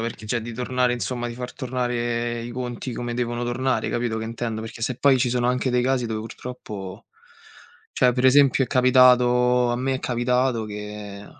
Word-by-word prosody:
perché 115 -1 -5
cioè, 120 +1 -1
di 120 +1 -7
tornare 125 +1 0
insomma, 120 0 -3
di 120 - -5
far 125 0 -6
tornare 120 -2 -2
i 120 - -6
conti 125 0 -5
come 120 +1 -4
devono 120 0 -2
tornare, 130 +2 -1
capito 120 -2 -1
che 110 - -4
intendo? 115 -1 -4
Perché 115 0 -8
se 125 +1 -1
poi 135 -2 +4
ci 125 - +1
sono 120 0 +1
anche 125 +1 0
dei 125 0 +2
casi 130 -1 +1
dove, 110 -1 -3
purtroppo 105 -4 -8 0.9
cioè, 125 -1 +3
per 125 +1 -1
esempio, 135 0 +5
è - - -9
capitato 125 -1 +4
a - - -1
me 130 +2 -1
è - - -2
capitato 125 -1 0
che, 105 -1 -8
120 Hz, 190 wpm, -23 LUFS, 115-125 Hz, 0.9 s, esempio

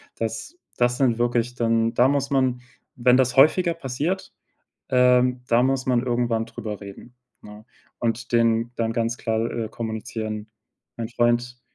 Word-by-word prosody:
Das 115 - -5 0.2
das 120 0 +2
sind 120 -4 +2
wirklich 120 0 0
dann 115 -1 +1
da 125 - +5
muss 140 0 0
man 130 -3 +1 0.4
wenn 125 0 +5
das 130 0 +2
häufiger 170 +5 +5
passiert, 155 +5 -3 0.6
ähm, 125 0 +3
da 120 +1 +4
muss 135 0 0
man 125 -2 +1
irgendwann 120 -2 0
drüber 110 -2 -7
reden, 100 +4 -11 0.3
ne? 105 +1 -12 0.3
Und 115 +1 -2
denen 115 0 +2
dann 115 -1 -1
ganz 115 0 -1
klar, 110 0 -1
äh, 115 -2 -3
kommunizieren: 110 -1 -5 0.5
„Mein 115 -1 -4
Freund, 120 +1 0
120 Hz, 150 wpm, -23 LUFS, 115-125 Hz, 0.6 s, da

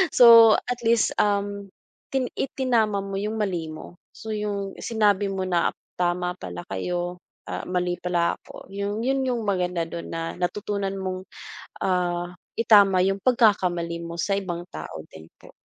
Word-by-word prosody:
So, 230 -2 +9
at 245 0 -3
least, 230 -1 +3
um, 200 -1 0 0.4
ti 265 -1 +1
itinama 235 -6 +1
mo 195 0 -5
yung 210 +2 -2
mali 180 -6 -1
mo. 155 +2 -9 0.2
So, 220 - -7
yung 205 -2 -3
sinabi 205 -3 +2
mo 190 -1 -2
na 175 -2 +1 0.3
tama 180 0 0
pala 85 -1 -7
kayo. 175 - -3 0.3
Ah, - - -4
mali 180 -1 -1
pala 175 -1 0
ako, - - -13
yung 200 +2 -2
yun 270 +1 +1
yung 245 -3 -1
maganda 180 -3 0
dun 170 +1 -7
na 165 0 -3
natutunan 195 +2 -2
mong, 185 -1 -4 0.5
ah, 175 -1 -1 0.2
itama 200 -5 +5
yung 195 +2 +2
pagkakamali 180 -9 +2
mo 170 0 -5
sa 195 +3 0
ibang 175 -3 -3
tao - - -7
din 80 0 -13
po, - - -15
195 Hz, 155 wpm, -25 LUFS, 175-210 Hz, 0.5 s, So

